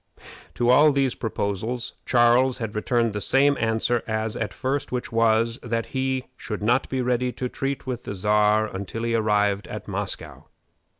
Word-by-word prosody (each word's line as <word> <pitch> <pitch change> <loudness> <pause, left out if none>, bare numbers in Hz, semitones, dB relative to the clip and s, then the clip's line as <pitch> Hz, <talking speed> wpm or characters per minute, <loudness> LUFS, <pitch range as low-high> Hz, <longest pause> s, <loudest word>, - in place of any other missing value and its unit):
To 120 0 +3
all 150 +4 +6
these 135 -3 +1
proposals 110 +2 -3
Charles 125 +1 +4
had 110 -4 -4
returned 115 +1 0
the 105 - -3
same 140 +6 +3
answer 115 +1 +1
as 110 0 -2
at 115 - -3
first, 135 0 -2
which 125 -1 -3
was, 115 0 +2
that 115 -1 -2
he 130 -1 -1
should 105 -2 -6
not 120 +4 +2
be 130 -1 -1
ready 125 0 0
to 125 - -3
treat 135 +2 -4
with 125 -2 -5
the 100 - -4
Czar 105 +2 +3
until 105 +2 -5
he 115 0 0
arrived 105 -2 +1
at - - -7
Moscow. - - -5
115 Hz, 170 wpm, -24 LUFS, 110-125 Hz, -, all